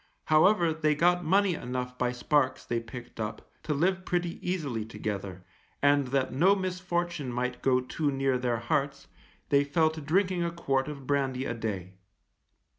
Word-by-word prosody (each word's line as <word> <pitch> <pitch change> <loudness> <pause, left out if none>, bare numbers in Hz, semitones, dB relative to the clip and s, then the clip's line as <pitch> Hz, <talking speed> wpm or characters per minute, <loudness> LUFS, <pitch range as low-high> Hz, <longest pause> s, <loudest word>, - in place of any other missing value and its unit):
However 170 +2 +4
they 155 -1 +1
got 175 +3 +3
money 190 +3 +3
enough 125 -3 -4
by 125 -1 +1
sparks 130 +2 +1
they 120 - -1
picked 115 +1 -10
up 110 0 -5
to - - -4
live 185 +5 +1
pretty 175 -2 -2
easily 145 -11 -2
together, 100 -4 -5 0.4
and 145 -1 +3
that 130 0 0
no 180 +9 +5
misfortune 175 -6 -2
might 125 +1 -2
go 130 -1 +3
too 145 +4 -2
near 135 -2 +1
their 120 -2 0
hearts, 135 +5 -1 0.4
they 140 0 +4
fell 155 +3 +2
to 160 0 -7
drinking 180 +3 +1
a 170 - 0
quart 140 -6 -1
of 140 -3 -7
brandy 135 -2 0
a - - -2
day. 100 -5 -4
140 Hz, 165 wpm, -29 LUFS, 125-170 Hz, 0.4 s, no